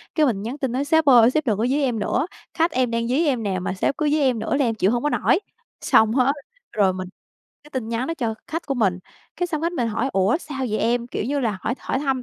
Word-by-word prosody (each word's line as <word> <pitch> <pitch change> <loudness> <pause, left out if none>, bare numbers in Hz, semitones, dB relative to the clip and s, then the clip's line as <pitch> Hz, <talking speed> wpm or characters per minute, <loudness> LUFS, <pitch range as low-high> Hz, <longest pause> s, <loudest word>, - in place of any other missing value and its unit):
cái 310 - +4
mình 220 -8 0
nhắn 235 +7 -5
tin 265 -4 -2
nói: 270 +3 -1
"Sếp 320 +1 +3
ơi, 245 -3 +7
sếp 310 0 0
đừng 210 -3 +2
có 225 - 0
dí 285 +3 +1
em 245 -5 0
nữa. 255 +7 0 0.3
Khách 330 +1 +1
em 255 -2 0
đang 230 0 -1
dí 280 +7 +1
em 255 -6 0
nè, 190 -2 -1
mà 185 - -3
sếp 195 - -1
cứ 305 -1 +1
dí 305 - +2
em 255 -5 +2
nữa - - -1
là 275 -2 +2
em 225 - 0
chịu 200 -1 +2
hông 240 +2 -1
có 295 - +2
nổi." - - +2 0.4
Xong 220 0 +4
hết 265 +2 +3 0.4
rồi 195 -3 +3
mình 185 0 -5 0.6
cái 295 - -16
tin 255 -5 -4
nhắn 230 +2 -2
đó 330 - -2
cho 230 -6 -2
khách 330 +2 -5
của 275 - -1
mình. 195 -7 +1 0.4
Cái 355 - 0
xong 315 -2 -3
khách 335 - 0
mình 245 -9 -1
hỏi: 230 +4 -1
"Ủa, 195 +7 +2
sao 295 -6 -8
vậy 215 - -1
em?" 240 +1 0
Kiểu 225 - -4
như 285 +3 -1
là 215 -6 -1
hỏi 240 - -1
hỏi 265 - -2
thăm, 270 -3 -1
250 Hz, 285 wpm, -22 LUFS, 225-285 Hz, 0.6 s, ơi